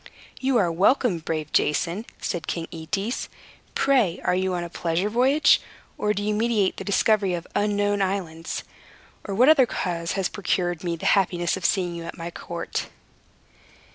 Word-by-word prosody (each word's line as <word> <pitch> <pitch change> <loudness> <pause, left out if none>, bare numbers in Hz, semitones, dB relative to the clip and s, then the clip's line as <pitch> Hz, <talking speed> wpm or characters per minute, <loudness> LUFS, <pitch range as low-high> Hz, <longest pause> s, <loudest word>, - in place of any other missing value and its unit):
"You 265 -1 +2
are 180 -6 +2
welcome, 195 - +3
brave 155 -1 -4
Jason," 175 +8 +1
said 175 -4 -3
King 165 -1 -3
Aetes. 195 +9 -3 0.5
"Pray, 240 -11 +2
are - - +2
you 185 0 0
on 175 - -2
a 170 - -6
pleasure 175 +5 -1
voyage? 270 +6 +4 0.3
Or 210 - 0
do 205 0 -2
you 210 +1 0
meditate 215 -3 +1
the - - -5
discovery 200 -1 +2
of 170 0 -6
unknown 205 -1 +1
islands? 180 -4 -2 0.6
or 200 - -3
what 250 +6 +5
other 280 -5 +6
cause 170 -5 -2
has 195 -2 0
procured 175 -3 -1
me 170 -1 -1
the 165 - -8
happiness 175 -3 +2
of 190 - -6
seeing 180 -3 +1
you 170 -1 -6
at 165 - -7
my 170 0 -5
court?" 170 0 -5
190 Hz, 170 wpm, -24 LUFS, 170-210 Hz, 0.6 s, other